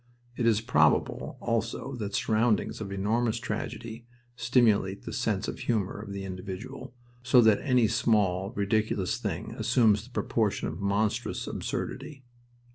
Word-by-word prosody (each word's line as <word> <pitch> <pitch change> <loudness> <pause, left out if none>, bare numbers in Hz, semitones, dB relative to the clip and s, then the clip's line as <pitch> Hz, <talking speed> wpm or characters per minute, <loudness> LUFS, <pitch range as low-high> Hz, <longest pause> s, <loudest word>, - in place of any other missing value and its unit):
It 120 - 0
is 110 -2 +3
probable 80 -10 +2
also 115 +3 -2
that 105 -3 -4
surroundings 110 0 +1
of 100 -2 -5
enormous 110 +4 0
tragedy 115 0 -5 0.3
stimulate 115 -5 +2
the - - -6
sense - - -1
of - - -5
humor 105 -4 -1
of 105 -2 -8
the 100 0 -5
individual, 95 +8 -7 0.3
so 125 0 +5
that 110 -3 +4
any 125 -5 +3
small, 105 -5 +1
ridiculous 105 -3 0
thing - - -4
assumes 110 -2 +3
the - - -16
proportion 110 -4 0
of - - -5
monstrous 105 +4 0
absurdity. 140 -1 -5
110 Hz, 135 wpm, -28 LUFS, 100-120 Hz, 0.3 s, so